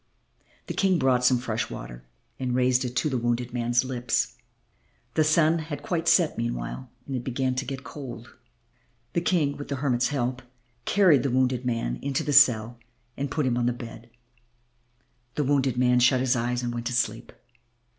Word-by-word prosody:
The -, -, -5 dB
King 190 Hz, -2 st, +2 dB
brought 130 Hz, -4 st, +2 dB
some 125 Hz, 0 st, +5 dB
fresh 115 Hz, -2 st, -3 dB
water -, -, -8 dB, 0.4 s
and 125 Hz, -2 st, -1 dB
raised 125 Hz, 0 st, +3 dB
it 125 Hz, 0 st, -5 dB
to 120 Hz, -, +1 dB
the 130 Hz, -4 st, -1 dB
wounded 120 Hz, +1 st, -1 dB
man's 120 Hz, +1 st, +1 dB
lips. 125 Hz, -2 st, -1 dB, 0.8 s
The 155 Hz, -, +3 dB
sun 155 Hz, +1 st, +3 dB
had 150 Hz, -2 st, -6 dB
quite 165 Hz, 0 st, -2 dB
set -, -, +3 dB
meanwhile -, -, -4 dB, 0.2 s
and 135 Hz, -, -4 dB
it 125 Hz, -, -3 dB
began 130 Hz, +1 st, -1 dB
to 130 Hz, +2 st, -3 dB
get 135 Hz, 0 st, -5 dB
cold. 120 Hz, -5 st, -9 dB, 0.8 s
The 170 Hz, -, +1 dB
King, 160 Hz, -5 st, +1 dB
with 145 Hz, -, -7 dB
the 140 Hz, -, -2 dB
hermit's 130 Hz, -3 st, +1 dB
help, 130 Hz, -2 st, -2 dB, 0.4 s
carried 180 Hz, -8 st, +4 dB
the 140 Hz, -, -1 dB
wounded 130 Hz, 0 st, +1 dB
man 115 Hz, -, -1 dB
into 140 Hz, -1 st, -1 dB
the 145 Hz, -, -1 dB
cell 120 Hz, -4 st, +5 dB, 0.4 s
and 140 Hz, +1 st, -3 dB
put 150 Hz, 0 st, -1 dB
him 120 Hz, -2 st, +1 dB
on 120 Hz, -, +1 dB
the 125 Hz, -, +1 dB
bed. 115 Hz, -1 st, -10 dB, 1.3 s
The 150 Hz, -, +1 dB
wounded 135 Hz, -3 st, +1 dB
man 125 Hz, 0 st, +4 dB
shut 130 Hz, +1 st, +4 dB
his 130 Hz, 0 st, +2 dB
eyes 120 Hz, +1 st, -1 dB
and 120 Hz, 0 st, -2 dB
went 120 Hz, 0 st, -4 dB
to 125 Hz, -, -3 dB
sleep. 115 Hz, -2 st, -1 dB
125 Hz, 185 wpm, -26 LUFS, 120-140 Hz, 1.3 s, some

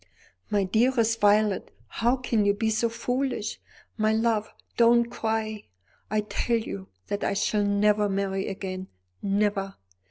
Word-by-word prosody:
"My 205 Hz, -2 st, +2 dB
dearest 230 Hz, +3 st, +2 dB
Violet, 205 Hz, -1 st, +3 dB, 0.2 s
how 240 Hz, +2 st, +1 dB
can 235 Hz, -4 st, 0 dB
you 200 Hz, 0 st, +3 dB
be 220 Hz, +1 st, 0 dB
so 225 Hz, +2 st, +1 dB
foolish? 245 Hz, 0 st, -2 dB, 0.4 s
My 215 Hz, 0 st, +2 dB
love, 220 Hz, -1 st, +1 dB, 0.2 s
don't 235 Hz, 0 st, +5 dB
cry. 220 Hz, -2 st, -2 dB, 0.4 s
I 215 Hz, 0 st, +1 dB
tell 230 Hz, +2 st, 0 dB
you 100 Hz, -, -6 dB, 0.2 s
that 205 Hz, -, -3 dB
I -, -, +1 dB
shall 205 Hz, +1 st, +1 dB
never 205 Hz, +1 st, +3 dB
marry 195 Hz, 0 st, -1 dB
again 190 Hz, -1 st, -5 dB, 0.3 s
never. 200 Hz, -1 st, 0 dB
215 Hz, 135 wpm, -26 LUFS, 200-230 Hz, 0.4 s, don't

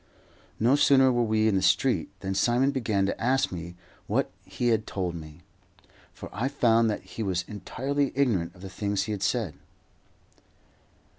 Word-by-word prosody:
No 120 Hz, +5 st, +4 dB
sooner 135 Hz, -2 st, +5 dB
were 120 Hz, -1 st, +1 dB
we 110 Hz, -1 st, +2 dB
in 110 Hz, -, +2 dB
the 95 Hz, -, +2 dB
street 90 Hz, -1 st, +2 dB
than 95 Hz, 0 st, -2 dB
Simon 120 Hz, +7 st, +2 dB
began 110 Hz, -7 st, 0 dB
to 95 Hz, -, -3 dB
ask 135 Hz, +2 st, +2 dB
me 85 Hz, -1 st, -7 dB, 0.3 s
what -, -, 0 dB
he 120 Hz, -, -1 dB
had 110 Hz, -2 st, +1 dB
told 90 Hz, -3 st, -2 dB
me, 80 Hz, -1 st, -10 dB, 0.7 s
for -, -, -9 dB
I 120 Hz, +5 st, -1 dB
found 115 Hz, -5 st, +3 dB
that 105 Hz, -, -3 dB
he 95 Hz, +4 st, -8 dB
was 90 Hz, -4 st, -1 dB
entirely 135 Hz, +6 st, -2 dB
ignorant 100 Hz, -11 st, +1 dB
of 90 Hz, -, -16 dB
the -, -, -5 dB
things 100 Hz, +1 st, -1 dB
he 110 Hz, -, -4 dB
had 100 Hz, -2 st, -3 dB
said. 110 Hz, -10 st, 0 dB
110 Hz, 170 wpm, -27 LUFS, 95-125 Hz, 0.7 s, sooner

